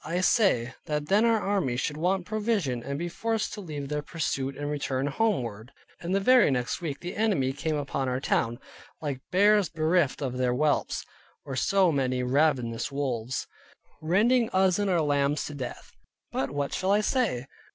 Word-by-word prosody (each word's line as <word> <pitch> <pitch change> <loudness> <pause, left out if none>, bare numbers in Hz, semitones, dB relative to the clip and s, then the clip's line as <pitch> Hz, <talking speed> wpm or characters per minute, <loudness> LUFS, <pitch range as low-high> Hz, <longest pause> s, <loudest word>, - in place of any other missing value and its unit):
I 175 +2 -1
say, 155 - +3
that 150 0 -2
then 205 +4 +4
our 230 -1 +3
army 195 -12 0
should 150 +3 -1
want 180 +3 0
provision, 205 - -1
and 140 +3 -4
be 170 +3 -3
forced 225 +5 -2
to 210 - -6
leave 150 -6 -6
their 150 +1 -2
pursuit 140 -3 -3
and 145 - -4
return 140 -2 -2
homeward; 130 - -1 0.3
and 175 +3 -2
the - - +3
very 250 +2 +5
next 125 +2 -1
week 150 -5 -4
the 175 - -5
enemy 190 -12 +1
came 155 +3 -2
upon 140 -2 -2
our 125 0 -1
town, 115 -3 0 0.4
like 140 -4 -4
bears 205 0 +4
bereft 160 -3 +1
of 130 -1 -3
their 125 -1 +2
whelps, 150 +3 0 0.4
or 135 - -5
so 190 +5 +3
many 130 -3 0
ravenous 125 -3 +1
wolves, 130 -3 -2 0.6
rending 220 +9 +3
us 190 0 +2
and 205 -1 +1
our 175 -3 +2
lambs 145 0 +1
to 150 - -6
death. 130 -4 -7 0.4
But 135 - -1
what 140 0 -3
shall 190 - -1
I 205 +1 +4
say? 210 - 0
150 Hz, 180 wpm, -27 LUFS, 135-190 Hz, 0.6 s, very